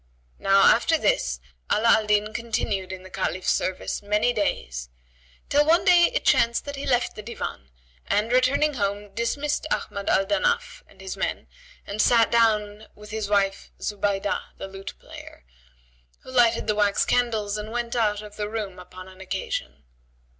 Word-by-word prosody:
Now 195 Hz, 0 st, +4 dB
after -, -, +5 dB
this 65 Hz, -2 st, 0 dB, 0.3 s
Ala 225 Hz, +2 st, +3 dB
al 220 Hz, -2 st, +4 dB
Din 210 Hz, +1 st, +1 dB
continued 225 Hz, -5 st, -2 dB
in 190 Hz, -1 st, -7 dB
the 190 Hz, -, -12 dB
Caliph's 185 Hz, -1 st, -1 dB
service 185 Hz, 0 st, -2 dB
many 210 Hz, +4 st, +1 dB
days; -, -, -2 dB, 0.6 s
till 290 Hz, +1 st, +4 dB
one 335 Hz, +5 st, +3 dB
day 350 Hz, -2 st, +6 dB
it -, -, -2 dB
chanced 235 Hz, 0 st, +3 dB
that 285 Hz, 0 st, -5 dB
he 275 Hz, -, -6 dB
left 245 Hz, -2 st, +1 dB
the 215 Hz, -, -7 dB
Divan 205 Hz, -, -6 dB, 0.4 s
and 215 Hz, +3 st, +1 dB
returning 260 Hz, +4 st, +3 dB
home, 205 Hz, -3 st, -3 dB
dismissed 285 Hz, +7 st, -1 dB
Ahmad 200 Hz, -8 st, -2 dB
al 195 Hz, -, +3 dB
Danaf 480 Hz, -, 0 dB
and -, -, -19 dB
his -, -, -5 dB
men -, -, -3 dB, 0.4 s
and 205 Hz, +2 st, -1 dB
sat 230 Hz, 0 st, +4 dB
down 215 Hz, -2 st, +2 dB
with 210 Hz, 0 st, -13 dB
his 215 Hz, -2 st, -3 dB
wife 200 Hz, -1 st, +1 dB
Zubaydab, 205 Hz, -1 st, -1 dB, 0.2 s
the -, -, -6 dB
lute 195 Hz, 0 st, -9 dB
player, -, -, -13 dB, 0.8 s
who -, -, -12 dB
lighted 240 Hz, -3 st, +3 dB
the 210 Hz, -, +1 dB
wax 205 Hz, -1 st, +2 dB
candles 220 Hz, -4 st, 0 dB
and 210 Hz, 0 st, -5 dB
went 240 Hz, +1 st, -3 dB
out 210 Hz, -3 st, +1 dB
of 210 Hz, 0 st, -12 dB
the 210 Hz, 0 st, -3 dB
room 210 Hz, -4 st, -5 dB
upon 185 Hz, 0 st, -11 dB
an 190 Hz, 0 st, -14 dB
occasion. 190 Hz, 0 st, -4 dB
210 Hz, 170 wpm, -25 LUFS, 200-235 Hz, 0.8 s, day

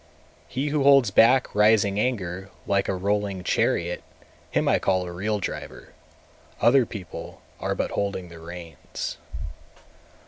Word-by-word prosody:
222. 130 Hz, -, -5 dB
He 150 Hz, -, 0 dB
who 150 Hz, 0 st, +1 dB
holds 135 Hz, -5 st, +6 dB
back 125 Hz, +5 st, +5 dB
rising 105 Hz, -1 st, +4 dB
anger 95 Hz, -6 st, -2 dB, 0.2 s
like 100 Hz, -1 st, +1 dB
a -, -, 0 dB
rolling 100 Hz, 0 st, -1 dB
chariot, 85 Hz, 0 st, 0 dB, 0.5 s
him -, -, 0 dB
I -, -, +4 dB
call 95 Hz, -1 st, +1 dB
a 90 Hz, -, -6 dB
real 105 Hz, +4 st, -1 dB
driver; -, -, -6 dB, 0.7 s
other 120 Hz, 0 st, +5 dB
people 95 Hz, -6 st, -8 dB, 0.2 s
are -, -, -1 dB
but -, -, -2 dB
holding 100 Hz, -3 st, -2 dB
the 85 Hz, -1 st, -11 dB
reins. 85 Hz, 0 st, -7 dB
100 Hz, 140 wpm, -25 LUFS, 90-115 Hz, 0.7 s, holds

